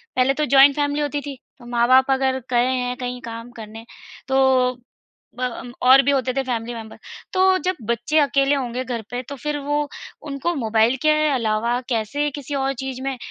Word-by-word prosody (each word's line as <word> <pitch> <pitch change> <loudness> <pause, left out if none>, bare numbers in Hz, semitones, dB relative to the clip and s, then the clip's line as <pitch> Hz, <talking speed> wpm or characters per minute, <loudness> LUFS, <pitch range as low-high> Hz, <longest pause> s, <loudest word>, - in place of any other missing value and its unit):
पहले 255 +1 +3
तो 300 +2 -1
joint 275 +1 +7
family 290 0 0
होती 290 0 -2
थी, 280 -1 -7 0.2
तो 240 - -14
माँ-बाप 245 +3 +3
अगर 265 0 +1
गए 240 0 +3
हैं 250 -1 -1
कहीं 250 -1 -5
काम 230 +1 -8
करने। 225 0 -10 0.4
तो 265 -1 +3 0.7
ब - - -5
अम, 245 0 -4
और 260 +2 +7
भी 280 - +2
होते 260 -2 0
थे 270 +1 -1
फ़ैमिली 240 -2 -3
मेंबर 220 -1 -9 0.4
तो 375 0 +4
जब 370 - +1
बच्चे 240 +7 +1
अकेले 280 0 +2
होंगे 255 -1 -3
घर 245 -3 -4
पे 245 +1 -3
तो 280 - -5
फ़िर 295 +4 -3
वो 295 0 0 0.4
उनको 280 +5 -2
मोबाइल 225 0 +2
के 310 - +4 0.2
अलावा 235 -1 0
कैसे 255 +6 -1
किसी 285 0 -6
और 270 0 0
चीज़ 265 -1 -5
में 270 -1 -3
260 Hz, 190 wpm, -21 LUFS, 240-280 Hz, 0.7 s, joint